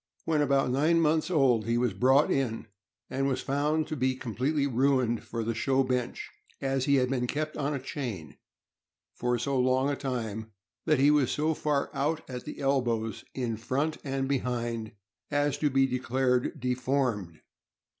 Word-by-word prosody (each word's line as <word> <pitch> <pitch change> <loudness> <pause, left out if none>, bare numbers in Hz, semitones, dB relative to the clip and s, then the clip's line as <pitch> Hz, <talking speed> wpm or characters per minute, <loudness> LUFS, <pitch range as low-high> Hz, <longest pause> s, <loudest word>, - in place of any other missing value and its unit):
When 155 -2 +2
about 140 -2 +2
nine 155 +6 +3
months 160 +1 +2
old 130 -10 +3
he 115 0 +2
was 120 -4 +1
brought 130 +8 +4
in, 125 -5 -1 0.4
and 135 +1 -1
was 130 -2 0
found 150 +3 +1
to 155 - -2
be 130 -1 +1
completely 130 +4 -1
ruined 130 -3 +1
for 115 -1 -4
the 115 +1 -1
show 135 +4 +2
bench, 125 -2 -2 0.3
as 135 -1 0
he 140 - +4
had 130 -2 +3
been 125 -2 0
kept 155 +3 -2
on 145 +1 -1
a - - -2
chain 120 - -6 0.8
for 125 0 0
so 135 +2 -1
long 130 +2 +2
a - - 0
time 110 -5 -4 0.3
that 155 -2 +3
he 145 +2 +6
was 145 -4 +3
so 155 +2 +1
far 150 -2 -1
out 155 +3 -1
at 125 -2 -7
elbows, 120 -5 0
in 120 -4 -2
front 140 +7 -1
and 135 -1 -2
behind, 120 -4 -2 0.4
as 145 -1 +1
to 150 - +2
be 135 0 +3
declared 130 +2 0
deformed. 125 - -1
130 Hz, 165 wpm, -29 LUFS, 120-140 Hz, 0.8 s, he